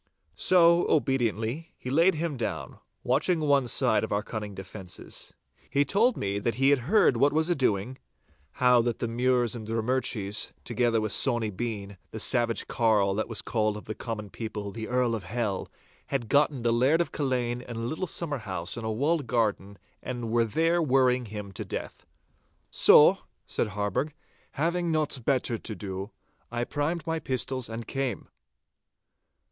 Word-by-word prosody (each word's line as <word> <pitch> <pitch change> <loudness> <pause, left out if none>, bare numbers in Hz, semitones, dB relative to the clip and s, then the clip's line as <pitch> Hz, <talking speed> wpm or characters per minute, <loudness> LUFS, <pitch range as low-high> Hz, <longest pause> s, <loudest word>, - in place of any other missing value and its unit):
So, 170 - +4
obediently 135 - 0
he 125 - -6
laid 165 +5 +4
him 160 -1 -2
down, 115 -4 -4 0.2
watching 155 +7 +2
one 140 -4 +2
side - - +2
of - - -4
our 105 0 0
cunning 105 -3 -6
defences. 95 -1 -6 0.3
He 140 +1 +2
told 220 - +2
me 100 0 -1
that 115 +2 -1
he 135 +3 +4
had 140 - +4
heard 200 - +4
what 140 +4 +4
was 160 +3 +2
a - - +3
doing—how 115 - 0
that 120 0 -1
the - - -2
Mures 120 0 +1
and 110 -2 -7
Drummurchies, 110 -3 0
together 120 -1 +1
with 110 -1 -2
Sawny 120 -5 +2
Bean, 100 -2 -5
the 110 - -7
savage 120 0 +2
carl 110 -5 +2
that 110 +2 -2
was 115 - -1
called 110 -1 0
of 105 - -10
the 110 - -4
common 105 -3 -6
people 105 -3 -5
'The 110 +1 -6
Earl 125 -1 +1
of 110 -3 -4
Hell,' 110 -5 -2 0.4
had 125 -5 -2
gotten 145 -3 +2
the 120 -1 +2
Laird 130 +7 +3
of 170 - 0
Culzean 125 -4 -1
in 120 -1 -8
a - - -4
little 155 +11 -3
summer 150 -4 -2
house 95 -5 -3
in 115 - -5
a 110 - -2
walled 145 +5 0
garden 105 -4 -1 0.2
and 120 -3 -4
were 115 0 +3
there 165 +9 +1
worrying 130 -4 +3
him 105 -2 -7
to 95 - -5
death. - - -7 0.6
'So,' - - +6 0.3
said - - -1
Harburgh, 105 +9 -2 0.4
'having 170 +3 0
nought 150 -5 -1
better 125 -4 +1
to 110 - -6
do, 95 +1 -6 0.4
I 120 0 -1
primed 155 +5 -2
my 165 -1 -1
pistols 130 -2 -2
and 115 +1 -6
came. 135 -3 -3
120 Hz, 170 wpm, -27 LUFS, 110-140 Hz, 0.6 s, So